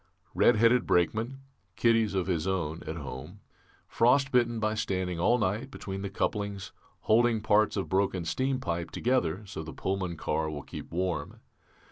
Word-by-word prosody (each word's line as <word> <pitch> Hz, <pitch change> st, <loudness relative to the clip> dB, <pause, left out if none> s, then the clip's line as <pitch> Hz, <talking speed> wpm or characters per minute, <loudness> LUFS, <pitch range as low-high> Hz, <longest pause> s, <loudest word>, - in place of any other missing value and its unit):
Red -, -, +5 dB
headed 115 Hz, +3 st, +4 dB
brakeman 110 Hz, +9 st, +1 dB, 0.3 s
(kiddies 115 Hz, -3 st, +2 dB
of 95 Hz, -2 st, +1 dB
his 85 Hz, -3 st, -1 dB
own 85 Hz, -4 st, -2 dB
at 80 Hz, -, -3 dB
home), 75 Hz, +5 st, -8 dB, 0.5 s
frostbitten 125 Hz, -2 st, +3 dB
by 110 Hz, 0 st, 0 dB
standing 95 Hz, -5 st, -2 dB
all 120 Hz, +8 st, +4 dB
night 110 Hz, +4 st, -1 dB
between 95 Hz, -7 st, -6 dB
the 100 Hz, -, -3 dB
couplings, 100 Hz, -1 st, -2 dB, 0.3 s
holding 115 Hz, +1 st, +3 dB
parts 105 Hz, 0 st, +2 dB
of 95 Hz, -, -2 dB
broken 95 Hz, -2 st, 0 dB
steampipe 125 Hz, -2 st, -1 dB
together 110 Hz, -6 st, 0 dB
so 95 Hz, -, -6 dB
the 80 Hz, 0 st, -8 dB
Pullman 95 Hz, -3 st, -2 dB
car 80 Hz, +1 st, -1 dB
will 75 Hz, -2 st, -6 dB
keep -, -, -9 dB
warm. 85 Hz, -4 st, -2 dB
100 Hz, 150 wpm, -29 LUFS, 85-115 Hz, 0.5 s, Red